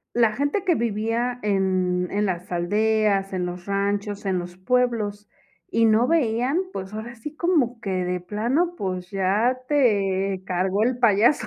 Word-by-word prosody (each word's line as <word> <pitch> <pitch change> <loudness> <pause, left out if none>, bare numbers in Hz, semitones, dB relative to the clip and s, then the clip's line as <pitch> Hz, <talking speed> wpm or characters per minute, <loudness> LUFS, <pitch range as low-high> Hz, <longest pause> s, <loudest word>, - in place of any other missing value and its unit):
La 230 -3 +4
gente 285 - -1
que 350 -3 +3
vivía 230 +2 -1
en 185 -3 +1
en 205 +1 0
las 180 -1 -4
aldeas, 205 +2 +1
en 180 - -1
los 180 0 -6
ranchos, 200 +1 -1
en 190 -2 0
los 175 0 -7
pueblos, 215 -2 0 0.4
y 230 - +2
no 225 +3 +4
veían, 255 -2 +1 0.2
pues, 190 - -6
ahora 230 +2 -6
sí 295 +7 -9
como 295 -10 +1
que 195 - -4
de 180 -1 -1
plano, 245 - 0
pues, 185 - -4
ya 205 +6 +1
te 195 -8 +1
cargó 185 +3 0
el 245 +2 +1
payaso. 235 +3 +3
210 Hz, 155 wpm, -24 LUFS, 190-240 Hz, 0.4 s, La